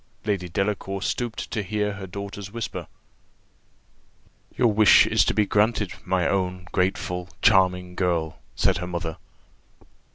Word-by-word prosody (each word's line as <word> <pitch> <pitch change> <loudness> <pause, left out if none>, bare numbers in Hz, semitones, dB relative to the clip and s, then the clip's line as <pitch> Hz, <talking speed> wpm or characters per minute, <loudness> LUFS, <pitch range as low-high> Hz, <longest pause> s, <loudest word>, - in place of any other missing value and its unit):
Lady 100 -4 -1
Delacour 100 +1 -2
stooped 120 0 -3
to 110 - -1
hear 105 +1 -1
her 100 -1 -7
daughter's 100 +1 -7
whisper. 115 0 -5 1.7
"Your 120 -4 +3
wish 105 -1 +7
is - - +3
granted, 105 -1 +1
my 90 -2 +1
own 90 -2 -1
grateful, 90 -1 -1
charming 90 -4 +3
girl," 85 -4 -1 0.2
said - - +2
her 90 -1 -4
mother. 85 -2 -4
95 Hz, 120 wpm, -24 LUFS, 90-105 Hz, 1.7 s, wish